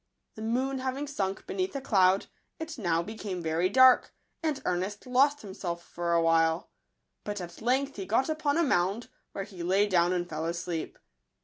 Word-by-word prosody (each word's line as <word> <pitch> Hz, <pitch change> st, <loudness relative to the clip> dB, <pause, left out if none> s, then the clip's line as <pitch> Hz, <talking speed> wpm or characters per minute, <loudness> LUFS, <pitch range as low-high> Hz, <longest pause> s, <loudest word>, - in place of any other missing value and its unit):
The 220 Hz, -, -10 dB
moon 260 Hz, +4 st, -1 dB
having 260 Hz, +2 st, -2 dB
sunk 195 Hz, -9 st, -3 dB
beneath 370 Hz, -4 st, -2 dB
a -, -, -1 dB
cloud, 190 Hz, -6 st, +3 dB, 0.3 s
it 320 Hz, -4 st, -6 dB
now 170 Hz, -4 st, +1 dB
became 205 Hz, -2 st, -5 dB
very 165 Hz, +3 st, +1 dB
dark, 260 Hz, +4 st, +5 dB, 0.3 s
and 310 Hz, -4 st, -1 dB
Ernest 185 Hz, +3 st, -2 dB
lost 275 Hz, +3 st, +3 dB
him 195 Hz, -2 st, -8 dB
self 170 Hz, -3 st, -4 dB
for 170 Hz, 0 st, -3 dB
a 170 Hz, -, +4 dB
while; 165 Hz, 0 st, +2 dB, 0.5 s
but 205 Hz, -1 st, -4 dB
at 175 Hz, +1 st, -8 dB
length 265 Hz, +3 st, 0 dB
he 195 Hz, -2 st, -5 dB
got 230 Hz, +6 st, +2 dB
upon 310 Hz, -1 st, 0 dB
a 340 Hz, -, +3 dB
mound, 205 Hz, -, +1 dB, 0.2 s
where 195 Hz, -, -3 dB
he 190 Hz, -3 st, -10 dB
lay 190 Hz, +4 st, +3 dB
down 175 Hz, -2 st, +3 dB
and 175 Hz, -1 st, -1 dB
fell 160 Hz, -1 st, -4 dB
asleep. 170 Hz, -1 st, -4 dB
200 Hz, 185 wpm, -29 LUFS, 175-260 Hz, 0.5 s, dark